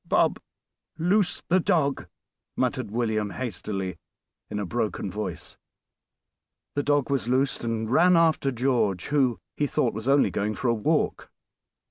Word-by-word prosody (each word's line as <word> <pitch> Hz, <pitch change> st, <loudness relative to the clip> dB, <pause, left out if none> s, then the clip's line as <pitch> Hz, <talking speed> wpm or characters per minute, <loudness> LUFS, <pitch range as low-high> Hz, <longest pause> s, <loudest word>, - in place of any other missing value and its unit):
"Bob, -, -, +2 dB, 0.6 s
loose 180 Hz, +4 st, +1 dB
the 185 Hz, +2 st, +4 dB
dog," 160 Hz, -7 st, +1 dB, 0.5 s
muttered -, -, -1 dB
William 110 Hz, -2 st, -1 dB
hastily, 100 Hz, -3 st, -4 dB, 0.5 s
in -, -, -4 dB
a 105 Hz, -, -2 dB
broken 105 Hz, -1 st, -2 dB
voice. 95 Hz, -4 st, -6 dB, 1.1 s
The 145 Hz, -, 0 dB
dog 145 Hz, -1 st, +1 dB
was 135 Hz, -4 st, 0 dB
loosed, 130 Hz, +2 st, +1 dB
and 115 Hz, -1 st, -2 dB
ran 175 Hz, +9 st, +5 dB
after 160 Hz, -4 st, +3 dB
George, 115 Hz, -7 st, 0 dB
who, 135 Hz, -5 st, +2 dB, 0.2 s
he 145 Hz, -, 0 dB
thought, 125 Hz, -3 st, 0 dB
was 110 Hz, +3 st, -6 dB
only 140 Hz, +1 st, +4 dB
going 105 Hz, +1 st, -1 dB
for 130 Hz, -, -1 dB
a -, -, +4 dB
walk. 110 Hz, -2 st, 0 dB
125 Hz, 140 wpm, -26 LUFS, 105-145 Hz, 1.1 s, ran